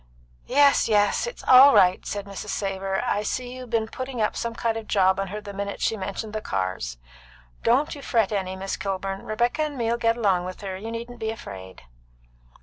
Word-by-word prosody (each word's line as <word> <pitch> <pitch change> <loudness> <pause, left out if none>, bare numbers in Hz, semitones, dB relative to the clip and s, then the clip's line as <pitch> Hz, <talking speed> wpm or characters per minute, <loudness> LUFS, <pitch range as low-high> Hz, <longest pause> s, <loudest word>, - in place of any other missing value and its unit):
"Yes, 280 -3 +4
yes. 205 - +2
It's 485 - -8
all 265 +2 +8
right," 180 0 +5
said 205 -1 -4
Mrs. 200 +1 -7
Savor. 195 -1 -2
"I 205 - 0
see 245 +4 -3
you'd 255 -1 -9
be'n 225 -1 0
putting 255 +1 -6
up 215 - +1
some 230 -1 -3
kind 230 -1 -1
of 225 -1 -6
job 190 -1 +3
on 195 - -1
her 210 +3 -5
the 205 -1 -8
minute 200 0 -4
she 225 - +1
mentioned 200 +2 -5
the 215 - -3
cars. 95 - -3 0.6
Don't 260 +6 +2
you 285 - -9
fret 225 -6 +1
any, 190 -2 -2
Miss 195 +1 -4
Kilburn. 195 0 -3
Rebecca 240 +7 0
and 300 -2 -2
me'll 235 0 0
get 230 0 +1
along 190 -6 +2
with 185 +2 -7
her, 195 -2 -4
you 210 +4 -6
needn't 235 +1 -7
be 220 - -2
afraid." 95 - -8
210 Hz, 205 wpm, -25 LUFS, 195-235 Hz, 0.6 s, all